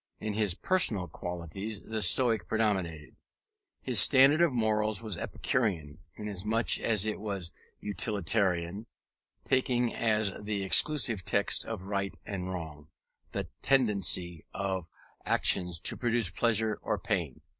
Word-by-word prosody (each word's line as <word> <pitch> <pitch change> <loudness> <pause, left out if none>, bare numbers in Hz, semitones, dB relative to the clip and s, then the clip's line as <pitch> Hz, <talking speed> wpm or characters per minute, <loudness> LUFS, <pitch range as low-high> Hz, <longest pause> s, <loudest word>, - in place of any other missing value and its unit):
In 110 -1 -4
his 105 -4 +1
personal 110 - +2
qualities 90 +6 -6
the 110 -1 -5
Stoic 110 -1 +3
predominated. 95 -8 -2 0.7
His 125 -5 +3
standard 140 +6 +6
of 170 -3 +4
morals 110 -2 0
was 110 -4 -3
Epicurean, 85 -10 -3 0.2
inasmuch 105 +2 -1
as 110 -3 0
it 110 - -3
was 100 -5 -4 0.3
utilitarian, 100 -1 -1 0.6
taking 125 -2 0
as 110 -3 0
the 105 -1 -3
exclusive 115 -1 +3
test 100 +3 +1
of 110 -5 -6
right 100 0 -4
and 95 -2 -5
wrong, 80 -5 -7 0.4
the - - -4
tendency 100 - +2
of 95 -3 -3 0.4
actions 90 -2 +2
to - - +1
produce 120 -6 +1
pleasure 110 0 +1
or - - -2
pain. - - -3
105 Hz, 125 wpm, -29 LUFS, 90-115 Hz, 0.7 s, standard